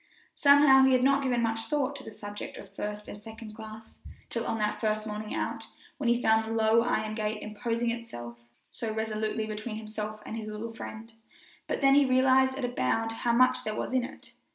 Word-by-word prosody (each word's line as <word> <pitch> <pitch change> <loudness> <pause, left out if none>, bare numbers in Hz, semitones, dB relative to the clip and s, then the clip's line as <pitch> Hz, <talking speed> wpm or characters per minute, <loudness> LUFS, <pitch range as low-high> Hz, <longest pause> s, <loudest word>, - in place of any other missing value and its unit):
Somehow 280 -2 +7
he 265 0 +5
had 255 -1 +3
not 275 +1 +4
given 245 -3 +1
much 225 0 -1
thought 285 -2 0
to 270 - -6
this 220 - -10
subject 205 0 -7
of 195 - -12
first 210 +1 -5
and 205 - -9
second 220 0 -9
class 220 0 -11 0.3
till 230 -1 -2
on 225 - -1
that 210 -1 -1
first 215 -1 0
morning 215 0 -5
out, - - -3 0.3
when 255 -4 +1
he 240 +1 +2
found 220 0 +4
the 225 +1 -4
low 225 +1 +4
iron 215 -2 0
gate 215 -1 -2
imposing 230 +2 -1
itself 120 - -7 0.3
so 225 -2 -4
resolutely 220 0 -2
between 215 +1 -5
himself 215 -1 -5
and - - -5
his 220 -1 -5
little 215 +2 -5
friend; 225 0 -8 0.5
but - - -2
then 275 0 +6
he 285 +1 +6
realized 260 0 +4
at 265 - -1
a - - -1
bound 225 - 0
how 235 +1 0
much 255 +1 +4
there 215 0 -3
was - - -3
in 255 -1 +2
it. 245 - -9
225 Hz, 210 wpm, -29 LUFS, 215-250 Hz, 0.5 s, Somehow